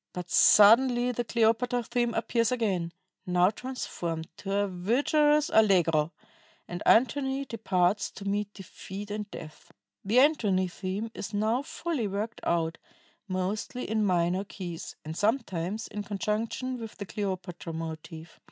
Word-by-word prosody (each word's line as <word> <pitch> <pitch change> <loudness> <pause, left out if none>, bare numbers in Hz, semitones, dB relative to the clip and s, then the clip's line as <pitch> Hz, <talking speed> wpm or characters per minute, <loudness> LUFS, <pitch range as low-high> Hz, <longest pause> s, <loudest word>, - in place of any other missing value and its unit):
But 180 -1 -6
suddenly 240 +4 +6
the 240 0 -2
Cleopatra 235 +2 +1
theme 240 0 -1
appears 230 0 +1
again, 195 -9 0 0.4
now 180 +1 +4
transformed 175 -10 -5
to 195 - -6
a 200 +1 +1
vigorous 290 - +2
allegro, 170 -7 +4 0.6
and 175 -1 -6
Antony 265 +3 +3
departs 200 -4 0
to 200 - -9
meet 205 +1 -1
defeat 195 +1 -8
and 210 0 -4
death. 155 -5 -11 0.3
"The 210 +5 +1
Antony 210 -11 +3
theme 195 +5 -4
is 195 - -6
now 220 +5 +1
fully 305 -5 -3
worked 210 +4 -4
out, 165 -1 0 0.5
mostly 195 +6 -3
in 220 0 +1
minor 180 0 +1
keys 180 -4 -7
and 155 +1 -5
sometimes 210 -2 -1
in 210 - -5
conjunction 215 +5 -2
with 225 -2 -8
the 200 - -5
Cleopatra 185 -4 -4
motive. 160 0 -7
205 Hz, 135 wpm, -28 LUFS, 180-235 Hz, 0.6 s, suddenly